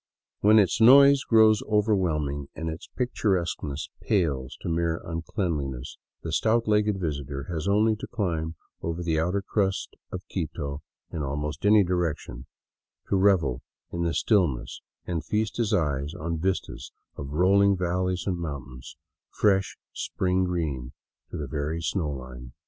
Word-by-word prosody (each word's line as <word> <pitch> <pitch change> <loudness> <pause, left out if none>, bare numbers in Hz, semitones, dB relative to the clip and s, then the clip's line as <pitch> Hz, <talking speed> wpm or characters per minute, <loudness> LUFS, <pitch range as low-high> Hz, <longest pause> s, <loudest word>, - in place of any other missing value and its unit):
But - - +1
when 110 +1 +8
its 105 +2 +3
noise 140 +3 +8
grows 110 -2 +5
overwhelming 85 -10 +1
and 80 0 -3
its 80 +3 -9
picturesqueness 90 - -1
pales 75 - 0
to - - -6
mere 85 0 0
uncleanliness, 80 - -3 0.2
the - - -4
stout 115 +1 +2
legged 105 -2 +2
visitor 70 -4 -3
has 80 +2 -3
only 105 +2 +3
to - - -7
climb 85 -8 -2 0.3
over 85 +1 -3
the 80 -2 +1
outer 90 +5 0
crust 95 -1 -1 0.2
of 90 0 -7
Quito 75 -5 -4 0.3
in 80 - -4
almost 75 +5 -2
any 105 -1 +6
direction 80 -8 -2 0.6
to - - +2
revel 95 -10 +3 0.3
in 85 - -2
the 85 -1 0
stillness 90 - +1 0.2
and 85 -3 -3
feast 110 +7 -1
his 115 -3 0
eyes 75 -5 0
on 85 -3 -3
vistas 95 +3 -3 0.2
of 70 0 -7
rolling 100 +4 +4
valleys 90 0 -1
and 90 -3 -1
mountains, 70 -6 -7 0.3
fresh 95 -2 +1 0.2
spring 95 0 0
green 75 -8 -3 0.4
to - - -6
the 75 - -3
very 75 +3 -3
snow 80 -1 -1
line. 65 -3 -8
85 Hz, 145 wpm, -26 LUFS, 75-100 Hz, 0.6 s, when